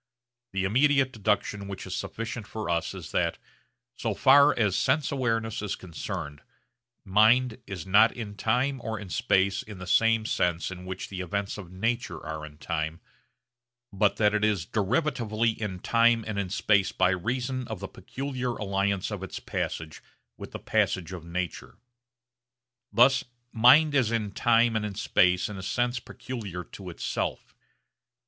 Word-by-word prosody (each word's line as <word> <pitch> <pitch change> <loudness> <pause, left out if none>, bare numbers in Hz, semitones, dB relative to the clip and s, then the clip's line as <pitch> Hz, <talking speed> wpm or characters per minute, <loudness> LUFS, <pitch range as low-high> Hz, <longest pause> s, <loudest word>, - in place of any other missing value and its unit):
The 95 0 0
immediate 130 +5 +3
deduction 105 -1 -1
which 100 -1 -6
is 95 -1 -4
sufficient 115 -1 -5
for 110 -5 -4
us 85 -1 -1
is - - -8
that - - 0 0.6
so - - -2
far 140 +2 +7
as 105 -5 +2
sense 150 +7 +1
awareness 115 -5 -1
is 105 -2 -2
concerned 75 -4 -6 0.6
mind 110 +5 +4
is 95 -5 -6
not 105 +4 +6
in 105 -4 -7
time 125 +5 0
or 110 -1 -3
in 100 -2 -9
space 95 +2 +2
in 105 -5 -10
the 90 - -8
same 115 +4 +3
sense 90 -4 0
in 90 -1 -8
which 95 0 -6
the 95 -2 -5
events 100 +3 -3
of 90 -4 -10
nature 105 -2 -2
are 80 0 -5
in 75 -1 -15
time, 80 +1 -3 0.9
but 100 0 +2
that 105 -1 +3
it 105 0 +1
is 105 -6 +1
derivatively 115 - 0
in 105 -4 -4
time 115 +3 +3
and 105 -2 -2
in 100 -2 -2
space 100 0 +2
by 90 - +2
reason 125 +7 -2
of 110 -5 -5
the 95 - -5
peculiar 130 0 -4
alliance 100 -1 -1
of 105 -3 -4
its 95 - -6
passage 80 -1 -4 0.3
with - - -9
the - - -6
passage 95 0 0
of 90 -3 -7
nature. 85 0 -5 1.1
Thus 125 +5 +5 0.3
mind 135 +7 +6
is 130 -6 +3
in 110 -3 -1
time 115 +2 +3
and 110 - 0
in 105 -2 -4
space 90 -2 +2
in 105 -3 -7
a - - -6
sense 120 +5 -1
peculiar 105 -8 -7
to 95 +1 -10
itself. 85 - -4
105 Hz, 160 wpm, -27 LUFS, 95-120 Hz, 1.1 s, far